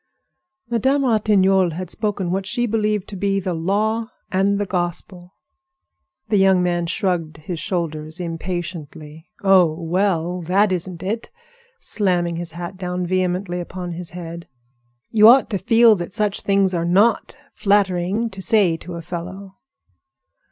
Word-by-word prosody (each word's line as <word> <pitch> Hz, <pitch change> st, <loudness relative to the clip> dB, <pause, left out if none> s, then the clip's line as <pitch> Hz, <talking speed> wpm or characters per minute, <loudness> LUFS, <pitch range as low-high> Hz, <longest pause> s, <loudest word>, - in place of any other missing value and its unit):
Madame 265 Hz, +4 st, +1 dB
Ratignolle 195 Hz, -6 st, +3 dB
had 180 Hz, +1 st, -6 dB
spoken 205 Hz, -5 st, -2 dB
what 190 Hz, +1 st, -2 dB
she 240 Hz, +4 st, 0 dB
believed 210 Hz, -3 st, 0 dB
to 205 Hz, -, -7 dB
be 195 Hz, +1 st, 0 dB
the 185 Hz, -2 st, -3 dB
law 215 Hz, +7 st, -1 dB, 0.2 s
and 195 Hz, +2 st, +2 dB
the 205 Hz, -, -1 dB
gospel. 175 Hz, 0 st, -4 dB, 0.9 s
The 210 Hz, -, +3 dB
young 190 Hz, -2 st, +4 dB
man 175 Hz, -1 st, 0 dB
shrugged 165 Hz, -4 st, -1 dB
his 160 Hz, +2 st, -6 dB
shoulders 160 Hz, -4 st, -3 dB
impatiently. 165 Hz, -2 st, -6 dB
"Oh! 190 Hz, -4 st, +5 dB
well! 175 Hz, 0 st, 0 dB
That 190 Hz, +4 st, +2 dB
isn't 180 Hz, -1 st, -2 dB
it," 220 Hz, +5 st, -3 dB, 0.5 s
slamming 175 Hz, -, 0 dB
his 170 Hz, -1 st, -6 dB
hat 175 Hz, +2 st, -7 dB
down 180 Hz, -1 st, -3 dB
vehemently 180 Hz, 0 st, -1 dB
upon 180 Hz, 0 st, -6 dB
his 170 Hz, 0 st, -7 dB
head. 170 Hz, -1 st, -8 dB, 0.6 s
"You 215 Hz, -1 st, +6 dB
ought 245 Hz, 0 st, +6 dB
to 200 Hz, -, -1 dB
feel 230 Hz, +1 st, +5 dB
that 175 Hz, +1 st, -6 dB
such 210 Hz, -1 st, 0 dB
things 195 Hz, -1 st, +2 dB
are 170 Hz, -1 st, 0 dB
not 200 Hz, +10 st, +2 dB, 0.2 s
flattering 200 Hz, +2 st, +1 dB
to 190 Hz, 0 st, -8 dB
say 195 Hz, -6 st, +3 dB
to 175 Hz, +1 st, -9 dB
a 170 Hz, -, -7 dB
fellow." 185 Hz, +3 st, -7 dB
185 Hz, 145 wpm, -21 LUFS, 175-205 Hz, 0.9 s, You